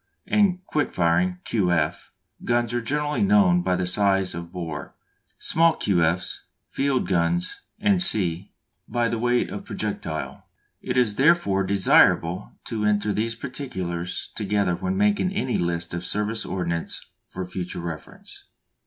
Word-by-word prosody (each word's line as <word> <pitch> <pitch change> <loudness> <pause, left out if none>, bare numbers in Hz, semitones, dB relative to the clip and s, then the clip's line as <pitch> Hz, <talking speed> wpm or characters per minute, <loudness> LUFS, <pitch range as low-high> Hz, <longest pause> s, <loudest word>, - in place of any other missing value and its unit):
and 185 -3 +2
quick 150 -1 -1
firing 180 - +1
(Q. 95 -6 0
F.) 85 - -1 0.3
guns 120 -1 +1
are 120 - 0
generally 150 - -1
known 200 -3 +4
by 90 - +1
the 90 0 -1
size 95 0 +2
of 85 0 -7
bore; 80 -4 -6 0.4
small 165 0 +3
Q. 90 -5 +1
F.'s, 85 +3 0 0.3
field 135 -1 0
guns, 85 -1 0 0.4
&c., 95 - +2 0.4
by 120 +1 0
the 115 -1 -2
weight 120 +1 +1
of - - -6
projectile. 80 -1 -4 0.3
It 125 0 -2
is 110 -5 +2
therefore 135 - +3
desirable 95 -2 +3
to 110 -3 -3
enter 105 0 +1
these 115 +2 -1
particulars 95 -10 -4
together 100 -3 0
when 190 - -2
making 205 -2 +2
any 130 -11 -1
list 85 -1 -2
of 85 0 -3
service 105 +4 -2
ordnance 85 -3 -3 0.2
for 95 - -5
future 90 0 -5
reference. 85 -2 -8
105 Hz, 140 wpm, -24 LUFS, 90-135 Hz, 0.4 s, known